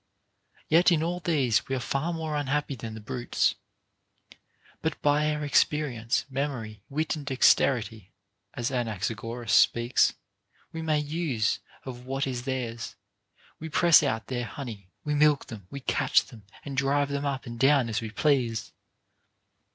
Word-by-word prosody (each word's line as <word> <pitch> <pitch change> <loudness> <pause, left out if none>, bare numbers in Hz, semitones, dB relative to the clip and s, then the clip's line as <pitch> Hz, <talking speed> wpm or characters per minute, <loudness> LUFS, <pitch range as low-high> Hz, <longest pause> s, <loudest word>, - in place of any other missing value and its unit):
* - - -34
Yea, 165 +2 +6
in 160 -3 +2
all 175 +2 -1
these 140 -10 +1
we 135 - -1
are - - -1
far 140 +7 -1
more 160 -2 -3
unhappy 145 0 -1
than 115 -3 -7
the - - -7
brutes. 120 +3 0 1.3
But 160 - -2
by 150 +1 +3
our 150 0 -2
experience, 140 -6 +1
memory, 130 -7 -4
wit, 155 +3 -1
and 150 - -7
dex 135 -2 +5
terity 110 -6 -2 0.5
(as 120 0 -2
Anaxagoras 115 -1 -3
speaks) 120 +4 +4 0.6
we 165 - -5
make 155 -2 0
use 145 -9 0 0.3
of 125 -1 -8
what 135 +1 -1
is 125 -2 -4
theirs; 120 -4 -4 0.6
we 160 - -6
press 170 +1 +6
out 115 -7 -1
their 120 0 -3
honey, 110 -9 -8
we 150 - -1
milk 150 -1 +3
them, 105 -5 -10
we 140 - -7
catch - - +2
them, 110 -5 -14 0.2
and 140 -2 -5
drive 140 +1 +1
them 140 0 -2
up 135 -1 -3
and 120 -1 -7
down 135 -2 +4
as 110 0 -2
we 110 - -5
please. 115 -5 0
135 Hz, 160 wpm, -27 LUFS, 115-150 Hz, 1.3 s, Yea